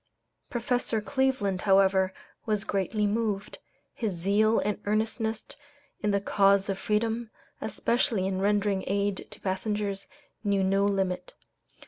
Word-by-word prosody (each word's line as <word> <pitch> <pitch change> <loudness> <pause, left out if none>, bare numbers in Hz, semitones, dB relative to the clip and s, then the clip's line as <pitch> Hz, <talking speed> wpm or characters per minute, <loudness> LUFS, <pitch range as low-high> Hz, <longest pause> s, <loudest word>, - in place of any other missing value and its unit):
Professor 245 -2 0
Cleveland, 235 -6 0
however, 190 -1 +4 0.4
was 210 -2 +1
greatly 210 +2 0
moved. 210 -1 -1 0.3
His 220 -5 -2
zeal 205 +6 +2
and 210 0 -1
earnestness 220 +1 -1 0.6
in 210 - +1
the 200 -1 +2
cause 200 0 +3
of 195 -1 -1
freedom, 225 +2 0 0.3
especially 220 -1 0
in 190 0 -1
rendering 205 -1 +1
aid 200 0 -1
to - - -11
passengers, 200 +1 -2 0.4
knew 200 -2 +2
no 195 +1 +2
limit. 190 -3 -1
205 Hz, 120 wpm, -28 LUFS, 195-220 Hz, 0.6 s, however